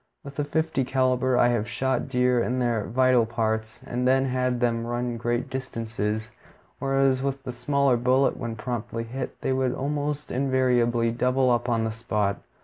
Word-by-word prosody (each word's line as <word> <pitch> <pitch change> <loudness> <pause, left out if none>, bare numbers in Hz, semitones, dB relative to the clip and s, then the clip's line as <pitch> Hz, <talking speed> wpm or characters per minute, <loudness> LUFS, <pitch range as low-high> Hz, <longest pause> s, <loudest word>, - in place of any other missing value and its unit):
With 140 +1 -9
a - - +2
fifty 160 -1 0
caliber 130 -1 +1
I 120 - +5
have 120 -1 0
shot 130 +2 -1
deer 125 -1 +2
in 125 +2 -1
their 120 -4 0
vital 125 -1 +3
parts 110 -1 -2
and 125 +1 -2
then 135 +1 +4
had 125 -1 0
them 115 -1 0
run 120 0 -2
great 120 +1 -1
distances, 115 -5 -3 0.5
whereas 135 -1 +2
with 135 0 -2
the 130 - -4
smaller 130 +1 +1
bullet, 130 +3 +2
when 115 -2 -5
properly 115 0 -4
hit, 125 +3 -6
they 130 - 0
would 130 -1 0
almost 145 +1 -2
invariably 125 -3 +2
double 125 +2 +2
up 120 +1 +1
on 115 -2 +1
the 110 - -1
spot. 105 -3 -1
125 Hz, 170 wpm, -26 LUFS, 115-130 Hz, 0.5 s, I